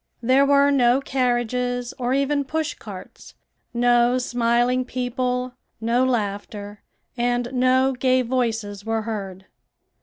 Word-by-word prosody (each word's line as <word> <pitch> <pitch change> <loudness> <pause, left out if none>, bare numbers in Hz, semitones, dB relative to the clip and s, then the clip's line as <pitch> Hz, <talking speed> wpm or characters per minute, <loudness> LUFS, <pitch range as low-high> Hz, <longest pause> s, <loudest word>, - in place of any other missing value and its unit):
There 265 +3 +4
were 280 0 +4
no 250 -2 +4
carriages 245 -2 -1
or 245 0 -1
even 280 +1 +1
push 315 +3 -2
carts; - - -11 0.4
no 240 0 +3
smiling 245 +1 +1
people, 250 0 -2 0.3
no 235 +3 +1
laughter, 205 -3 -3 0.4
and 245 +1 -1
no 260 +1 +3
gay 255 0 +2
voices 225 -5 -2
were 225 0 -1
heard. 195 -4 -6
245 Hz, 115 wpm, -23 LUFS, 230-255 Hz, 0.4 s, There